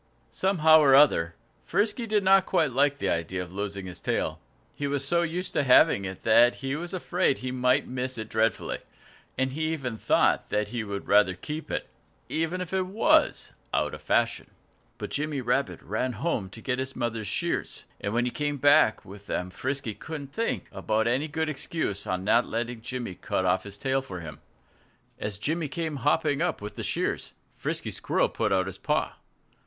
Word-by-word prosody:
Somehow 160 -5 +5
or 140 -3 +6
other, 85 - +5 0.3
Frisky 220 +3 0
did 210 -2 +2
not 190 0 +5
quite 160 -7 +2
like 140 +3 +2
the - - -2
idea 85 +2 -1
of 90 0 -12
losing 100 -1 -4
his 90 -1 -8
tail. - - -1 0.3
He 145 - -3
was 140 -1 -1
so 170 +2 +3
used 175 +2 -3
to - - +2
having 125 -7 +5
it 95 0 -7
that 120 +2 +5
he 135 0 -3
was 175 +3 -4
afraid 180 -4 +1
he 130 0 -4
might 125 0 +2
miss 130 0 -3
it 110 -1 -5
dreadfully. 110 0 0 0.6
And 130 0 +1
he 155 +2 -1
even 125 -8 -4
thought - - +2
that 105 0 0
he 120 -2 -3
would 100 -1 -5
rather 100 -3 +4
keep 150 - -6
it - - -3 0.4
even 165 +3 -1
if 180 0 -6
it 190 -1 +1
was 300 +11 +2 0.2
out - - 0
of - - -8
fashion. - - 0 0.5
But - - -6
Jimmy 150 -1 -2
Rabbit 135 +2 -1
ran 130 -1 -2
home 120 - -2
to 115 +4 -11
get 125 0 -1
his 130 0 -3
mother's 115 -3 -2
shears. - - -2 0.2
And 100 - -3
when 120 +2 +1
he 125 - -1
came 145 +1 -2
back 145 +3 +4
with 100 +1 -12
them 90 +1 -3
Frisky 130 0 -3
couldn't 145 +2 -8
think 230 +1 -2
of - - -10 0.2
any 130 +6 +1
good 160 +1 -2
excuse 140 - -2
for 95 - -1
not 110 +6 +2
letting 115 0 -3
Jimmy 120 -4 -5
cut 95 +1 -2
off 90 +2 +1
his 100 0 -7
tail 135 0 0
for 90 -9 -7
him. 80 -2 -9 0.8
As 105 -2 -3
Jimmy 155 +8 -1
came 155 +1 -3
hopping 145 +1 +1
up 175 -2 0
with 105 +1 -7
the - - -5
shears, - - -2 0.2
Frisky - - -3
Squirrel - - 0
put - - -1
out 95 -1 +3
his 95 - -6
paw. - - 0
130 Hz, 190 wpm, -27 LUFS, 105-155 Hz, 0.8 s, or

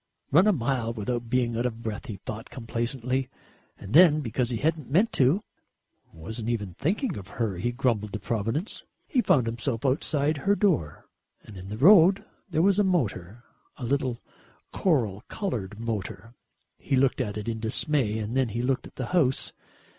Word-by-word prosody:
"Run 175 +9 +6
a - - +6
mile 125 - -1
without 115 +1 -3
being 120 -2 +1
out 120 +2 +1
of 115 -1 -7
breath," 110 +5 -5
he 110 - -5
thought 105 +3 -8
complacently, 125 +2 -3 0.5
and 100 - -9
then 155 -1 +7
because 120 -1 -1
he 120 - -2
hadn't 155 +1 -1
meant 190 +11 +2
to 145 - +3 0.7
("wasn't 110 +8 -6
even 105 -6 -2
thinking 190 - -1
of 95 -2 -8
her," 110 -6 -1
he 120 +7 -1
grumbled 120 -5 0
to 110 - -3
Providence) 115 - -2 0.2
he 260 -7 +1
found 130 - +3
himself 115 +2 -3
outside 145 +2 +1
her 195 +9 +2
door. 155 - 0 0.4
And 105 - -12
in 95 +1 -9
the 105 - -5
road 185 - +6 0.2
there 160 -2 +1
was 200 +1 +4
a - - +5
motor, 120 - -1 0.3
a 130 - -8
little 130 -2 -1 0.5
coral 115 - +1
coloured 110 - -4
motor. 115 0 -5 0.5
He 135 - -1
looked 130 0 +2
at 105 -4 -3
it 105 - -6
in 115 -1 -2
dismay 115 0 +1
and 110 +2 -4
then 130 -3 +2
he 115 +3 -3
looked 130 0 -1
at - - -19
the 130 - -3
house. 140 -8 +2
120 Hz, 175 wpm, -27 LUFS, 110-150 Hz, 0.7 s, then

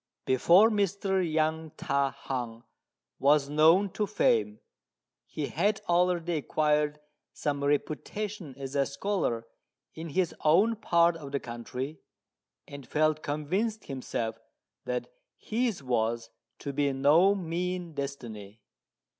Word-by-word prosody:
Before 175 - +5
Mr. 195 -2 +1
Yang 160 -1 -1
Ta 140 0 +1
hung 125 -4 -5 0.6
was 145 0 +3
known 165 +6 +5
to 210 +2 -1
fame, 110 - +1 0.7
he 150 - -4
had 200 +9 0
already 175 -1 +2
acquired 150 0 +1 0.3
some 145 -1 -2
reputation 155 - -2
as 135 0 -6
a 140 -1 +2
scholar 140 - -1 0.5
in 160 +1 -7
his 180 +2 0
own 195 +9 +4
part 170 -5 +3
of 145 -4 -9
the 140 - -1
country, 125 +5 -6 0.7
and 140 -3 -10
felt 155 0 +1
convinced 185 +10 -2
himself 115 -4 -4 0.5
that - - -3 0.2
his 225 - -2
was 115 -2 -1 0.3
to 140 - -5
be 140 0 +1
no 155 +9 +5
mean 180 -1 -3
destiny. 115 -7 -6
155 Hz, 115 wpm, -29 LUFS, 140-180 Hz, 0.7 s, Before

